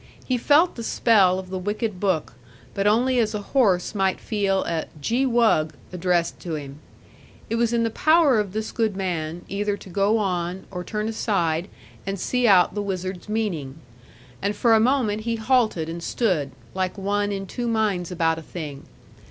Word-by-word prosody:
He 255 - 0
felt 295 +8 +4
the 230 - -5
spell 200 -6 +4
of 190 -1 -7
the 190 - -3
wicked 205 +1 -3
book, 180 -9 0 0.4
but 200 +1 0
only 245 +4 +3
as 215 -2 +1
a 210 - -3
horse 200 -10 +3
might 195 -2 +1
feel 200 -3 0
a 165 -1 -2
'gee 240 - +1
wug!' 220 - +2 0.2
addressed 175 -1 0
to 170 -3 -4
him. 140 -1 -7 0.7
It 230 - +1
was 235 0 +2
in 235 -1 +2
the 230 - 0
power 310 -3 +4
of 205 -3 -2
this 215 +2 -3
good 220 -4 0
man, 170 -3 -3
either 205 +1 -1
to 195 - -13
go 200 +4 +2
on, 180 -3 -2
or 180 -1 -5
turn 210 +3 -3
aside, 180 -6 0 0.4
and 195 0 -4
see 250 +4 +1
out 185 -4 +5
the 205 - -2
wizard's 185 -1 -4
meaning. 180 -12 -2 0.7
And 205 +1 -1
for 235 -2 +3
a 220 - +6
moment 225 -3 +2
he 230 +1 -1
halted 220 -8 +1
and 170 +1 -5
stood, 170 - 0 0.2
like 185 +1 -2
one 205 +1 0
in 195 -1 -3
two 240 +5 -4
minds 210 -6 0
about 165 -2 +1
a - - -9
thing. 150 -4 -8
200 Hz, 185 wpm, -24 LUFS, 180-225 Hz, 0.7 s, a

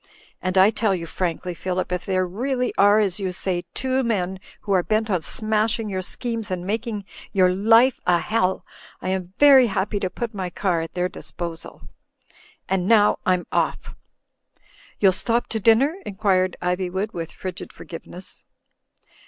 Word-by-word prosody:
"And 185 0 -1
I 190 +3 +7
tell 215 -3 +1
you 170 -2 -5
frankly, 180 +1 -3
Phillip, 185 +1 -3
if 180 -1 -3
there 185 -1 +1
really 250 +7 -2
are, 205 +1 +5
as 200 -2 0
you 190 -2 -2
say, 180 -1 -3
two 260 0 +1
men 190 -5 -1 0.2
who 205 - -5
are 185 -2 +4
bent 215 +3 0
on 180 -3 +1
smashing 215 +3 -1
your 190 -1 -2
schemes 230 +3 -4
and 180 -1 -3
mak 220 +5 -2
ing 210 -4 -4 0.3
your 185 -2 +4
life 225 +6 +4
a 175 -1 +5
hell 190 +2 0 0.2
— - - -22
I - - -2
am 185 -1 -3
very 275 -4 +7
happy 205 0 -1
to 185 - -1
put 235 +4 -5
my 190 -3 -3
car 175 -1 0
at 165 - -7
their 180 0 +1
disposal. 165 0 -8 0.8
And 190 -1 0
now 210 -2 +4
I'm 180 -1 +2
oflf." - - -1 1.1
"YouTl 195 -2 +5
stop 230 +5 0
to 220 - -2
dixmer?" 230 +8 +4
inquired 190 - 0
Ivjnvood, 185 +3 -1
with 165 -1 -5
frigid 185 -1 -7
forgiveness. 180 +2 -11
190 Hz, 170 wpm, -23 LUFS, 180-220 Hz, 1.1 s, I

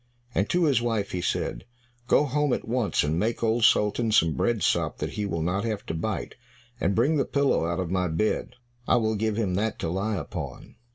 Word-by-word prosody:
And 100 +1 0
to 175 0 +2
his 140 -7 +3
wife 115 -4 -1
he 90 - -2
said, - - -2 0.4
"Go 150 - +4
home 145 -1 +1
at - - -3
once 120 -2 +1
and 75 +3 0
make 115 +3 -1
Old 115 +1 +2
Sultan 110 +1 +3
some 85 -8 +4
bread 120 +3 0
sop - - +1
that - - -3
he 105 -1 -3
will 85 -4 -2
not 95 +5 0
have 110 -3 -3
to - - -4
bite, 95 +6 -3 0.5
and 95 - +1
bring 140 +8 +3
the 140 - +3
pillow 140 - +1
out 85 +1 -2
of 90 -2 -3
my 90 -1 +1
bed, 85 +7 -1 0.3
I - - +4
will 110 -2 +2
give 110 0 -1
him 100 -5 0
that 105 +4 -1
to 85 - -3
lie 100 +5 -1
upon." 75 -5 -7
110 Hz, 220 wpm, -26 LUFS, 90-115 Hz, 0.5 s, Go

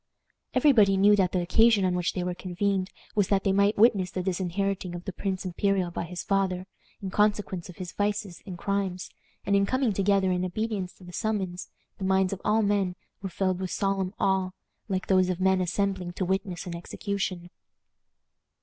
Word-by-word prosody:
Every 300 - +6
body 200 -6 +5
knew 205 +2 +6
that 185 -3 +2
the 180 -2 0
occasion 220 +2 +4
on 180 - +1
which 180 -1 0
they 180 - -2
were 180 0 -2
convened 185 +1 -1 0.2
was 205 -3 +2
that 195 -1 +2
they 195 - +2
might 200 +2 +3
witness 200 -4 +4
the 185 +1 -3
disinheriting 185 0 -2
of 175 - -8
the 195 - -4
prince 190 0 -3
imperial 185 0 0
by 170 - -3
his 180 +1 -6
father, 190 -2 0 0.4
in 190 - -3
consequence 205 -4 0
of 180 - -10
his 185 -2 -6
vices 205 -3 -2
and 180 -2 -6
crimes; 195 -1 -2 0.3
and 200 - +2
in 200 0 +3
coming 255 -3 +1
together 195 -1 +2
in 180 0 0
obedience 195 0 -2
to - - -18
the 180 0 -11
summons, 195 -4 -2 0.3
the - - -5
minds 190 0 +2
of 195 - -7
all 215 +1 +3
men 200 -3 +1 0.3
were 195 - -4
filled 185 0 -1
with 185 -1 -3
solemn 195 0 -1
awe, 190 -1 +2 0.4
like 190 -2 -2
those 185 -1 +3
of 180 -1 -2
men 190 0 +3
assembling 185 0 -1
to 185 - -2
witness 190 -1 -2
an 175 -1 -5
execution. 185 0 -4
190 Hz, 195 wpm, -27 LUFS, 180-200 Hz, 0.4 s, Every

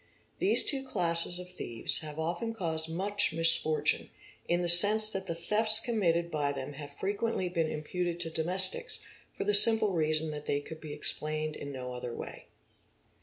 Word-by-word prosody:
These 385 - +3
two 270 -2 -2
classes 175 -7 -2
of 180 0 -11
thieves 115 -10 -1
have 150 -1 -9
often 175 +8 -5
caused 160 -5 -3
_ - - -8
much 200 0 -1
misfortune, 165 -1 0 0.4
in 175 +1 -1
the - - -2
sense 210 +5 +7
that 195 -1 -6
the 165 - -5
thefts 215 +6 +4
committed 170 -8 -2
by 145 -2 -2
them 140 0 -8
have 145 0 -11
frequently 200 -1 -4
been 165 -3 -3
imputed 175 +3 -5
to 165 -1 -6
domestics, 185 +4 +2 0.3
for - - -7
the 210 +1 -1
simple 215 -1 +7
reason 155 -1 -2
that 150 0 -10
they 145 - -2
_ - - -21
could 160 -1 -11
be 155 - -10
explained 155 +1 -4
in 140 - -9
no 125 -2 -8
other 125 -1 -8
way. - - -10
170 Hz, 180 wpm, -28 LUFS, 155-200 Hz, 0.4 s, sense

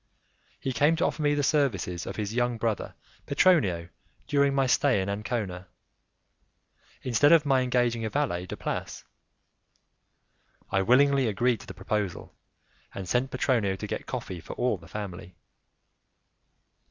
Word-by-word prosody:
He 135 - -3
came 150 +6 +3
to - - +1
offer - - -2
me 145 -1 +2
the 145 - 0
services 110 - 0
of - - -5
his 105 0 -3
young 120 0 0
brother 110 -2 -2 0.3
Petronio 105 - +3 0.4
during 140 -2 +2
my 135 -1 +3
stay 130 -2 +3
in 95 - -2
Ancona, 100 -3 -3 1.4
instead 130 +4 +4
of 165 -3 +6
my 135 -2 +3
engaging 120 -2 +1
a 110 - -1
valet 105 -11 -1
de - - -6
place. - - -4 1.7
I 95 - +2
willingly 135 +4 +4
agreed 115 +2 +1
to - - -13
the 95 - -8
proposal, 95 -1 -3 0.6
and 95 -2 -5
sent 125 +5 +1
Petronio 125 -7 +1
to - - -6
get - - -5
coffee 90 -2 -5
for - - -8
all 125 -6 0
the 85 - -15
family. 95 -3 -7
120 Hz, 145 wpm, -27 LUFS, 95-135 Hz, 1.7 s, of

